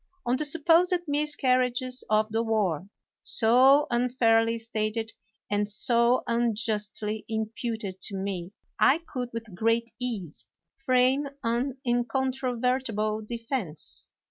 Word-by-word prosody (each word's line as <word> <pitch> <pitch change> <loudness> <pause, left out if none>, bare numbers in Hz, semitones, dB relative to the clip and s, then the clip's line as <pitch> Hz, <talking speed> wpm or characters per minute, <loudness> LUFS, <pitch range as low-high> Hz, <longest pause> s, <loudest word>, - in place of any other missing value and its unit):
On 245 +1 +2
the 300 +3 0
supposed 330 +4 +4
miscarriages 255 -4 +1
of 215 0 +2
the 225 +1 +1
war, 200 -6 -1 0.3
so 260 +6 +5
unfairly 230 -2 +2
stated 225 0 -3 0.4
and 205 0 0
so 235 +3 +3
unjustly 220 -2 -1
imputed 220 -3 -4
to 200 - -5
me, 190 -2 -4 0.3
I 280 - +5
could, 250 -3 -4
with 230 -3 -7
great 230 +4 0
ease, 215 -11 -5 0.3
frame 265 +1 +2
an 240 +3 -1
incontro 250 +1 -1
vertible 225 -4 0
defense. 230 - -4
235 Hz, 110 wpm, -27 LUFS, 215-255 Hz, 0.4 s, so